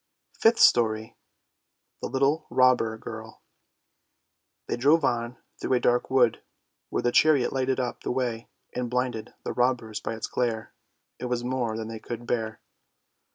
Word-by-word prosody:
FIFTH 225 +1 +4
STORY 110 -2 +4 0.9
THE - - -2
LITTLE 140 +4 +1
ROBBER 125 -3 +3
GIRL - - -9 1.3
They - - -2
drove 145 +5 +4
on 120 +1 -1 0.2
through - - -1
a 125 - +4
dark 120 0 +1
wood, 125 -3 +3 0.5
where - - -2
the 120 - +2
chariot 145 -2 +4
lighted 130 0 0
up 125 -2 -3
the - - -4
way 120 -3 -2 0.2
and 125 -1 -2
blinded 125 -3 -2
the - - -3
robbers 120 -3 0
by 115 - -4
its 110 - -4
glare; 115 -3 -2 0.5
it - - -4
was 125 -1 -1
more 120 -3 -1
than 110 -1 -4
they 115 0 -6
could 120 +1 -7
bear. 110 -2 -2
120 Hz, 155 wpm, -27 LUFS, 115-130 Hz, 1.3 s, FIFTH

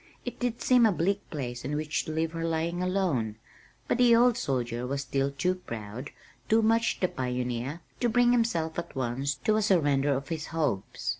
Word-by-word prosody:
It - - -5
did 245 -2 -2
seem 250 -3 +5
a - - +3
bleak 195 +3 -1
place 125 -5 -5
in 140 +3 -2
which 155 0 -1
to - - -4
leave 160 +1 -1
her 165 0 -4
lying 165 +2 -1
alone) 180 - 0 0.5
but - - 0
the 240 -2 +6
old 240 0 +5
soldier 125 - -2
was 140 +1 -2
still 135 +1 0
too 140 +6 0
proud, 115 - -7 0.4
too 225 +1 +4
much 230 +1 +2
the 185 - +2
pioneer, 125 +2 -3 0.2
to 240 - +2
bring 245 +1 +4
himself 170 -10 +1
at 170 - -7
once 135 +2 -1
to 215 - +1
a - - +2
surrender 145 -8 +3
of 135 +1 -5
his 160 -2 -3
hopes. 130 -8 -2
160 Hz, 195 wpm, -28 LUFS, 130-200 Hz, 0.5 s, the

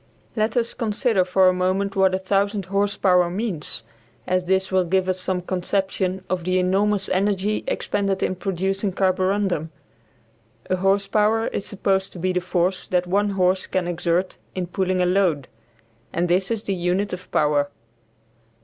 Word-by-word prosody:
Let 220 +1 0
us 235 -1 0
consider 220 -2 +1
for 185 +1 +3
a 185 - +5
moment 185 +2 0
what 190 -1 +3
1000 195 +1 0
horse 200 +2 0
power 180 -2 +3
means; 180 - -3 0.4
as 185 0 0
this 190 +1 +1
will 185 -1 +3
give 185 +2 +1
us 185 0 -1
some 185 -1 -2
conception 190 0 -1
of 185 -2 -2
the 185 +1 +1
enormous 195 +2 +1
energy 200 +2 0
expended 200 -2 -1
in - - +1
producing 195 +1 -2
carborundum. 185 -3 +1 1.0
A 185 - +2
horse 195 +2 +2
power 215 +2 +2
is 200 - -4
supposed 195 -1 0
to - - -9
be 185 +2 -1
the 180 - 0
force 180 +1 0
that 180 -1 +1
one 200 +3 +1
horse 185 -1 +1
can 185 -2 -1
exert 175 +1 -1 0.2
in 185 -1 -2
pulling 185 +1 0
a - - +2
load, 180 -7 +1 0.6
and 175 +1 0
this 185 +2 +1
is 225 -2 -2
the 200 - -1
unit 185 +3 -1
of 180 0 -7
power. 145 -1 +2
190 Hz, 165 wpm, -23 LUFS, 180-200 Hz, 1.0 s, a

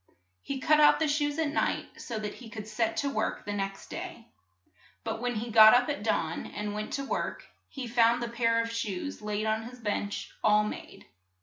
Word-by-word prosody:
He 275 -1 -4
cut 305 +3 +4
out 295 0 +7
the 320 - +1
shoes 290 0 0
at 320 -2 +1
night 300 - -2
so 230 - -5
that 210 -1 -4
he 240 -3 -11
could 215 -1 -7
set 220 +1 -1
to 280 - 0
work 215 - -2
the 205 - -3
next 195 -1 -4
day. - - -7 0.7
But 225 - -3
when 245 -1 -1
he 230 +2 -3
got 220 +1 +9
up 245 +2 +3
at 285 - -2
dawn 165 -6 -1
and 210 0 -4
went 210 +1 -4
to 275 - -2
work, - - -3 0.2
he 270 -3 -6
found 235 0 +3
the - - -2
pair 230 -1 +1
of 230 - -5
shoes 230 +2 -4
laid 210 0 -2
on 220 0 +1
his 250 - -12
bench 205 -3 -3
all 210 0 +5
made. 210 - -7
230 Hz, 210 wpm, -29 LUFS, 210-250 Hz, 0.7 s, got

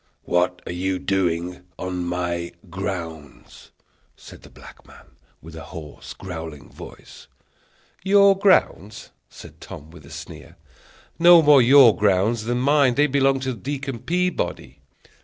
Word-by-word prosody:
"What 90 +1 -1
are - - -6
you 95 +2 -2
doing 90 -2 -2 0.2
on 90 -1 -4
my 85 -1 -4 0.2
grounds?" 85 -7 -8 0.5
said - - -14
the - - -16
black - - -16
man, - - -18 0.3
with 80 0 -12
a 80 - -10
hoarse, 80 -4 -10
growling 80 -6 -9
voice. - - -14 0.8
"Your 200 0 +5
grounds!" 185 - 0 0.2
said - - -15
Tom, 75 +2 -11
with 85 -3 -15
a 70 - -15
sneer; - - -11 0.6
"no 170 -1 +7
more 145 -2 +6
your 125 -2 +6
grounds 105 +3 0
than 120 +1 -1
mine; 140 -2 +2
they 145 - +3
belong 135 -1 +1
to 130 -1 -3
Deacon 135 +2 -6
Peabody." 175 - -3
95 Hz, 135 wpm, -22 LUFS, 85-140 Hz, 0.8 s, no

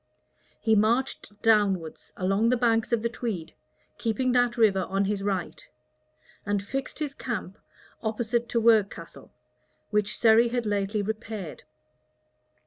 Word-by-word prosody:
He 220 - +2
marched 215 -1 0
downwards, 200 -7 +1
along 195 +5 +1
the 250 - +3
banks 230 -1 +1
of 230 -2 +1
the - - +2
Tweed, 225 -8 -5 0.5
keeping 240 +3 0
that 245 -1 +2
river 200 -5 +3
on 195 +1 +1
his 200 0 -1
right; 195 -3 -3 0.7
and 205 -1 -1
fixed 270 +6 -4
his 295 -3 -3
camp 225 -7 -5 0.4
opposite 235 +1 -1
to 235 - +1
Werkcastle, 205 -10 +1 0.6
which 210 -1 0
Surrey 230 +1 +5
had 240 0 -2
lately 205 0 -1
repaired. 215 -4 -6
220 Hz, 130 wpm, -27 LUFS, 200-235 Hz, 0.7 s, Surrey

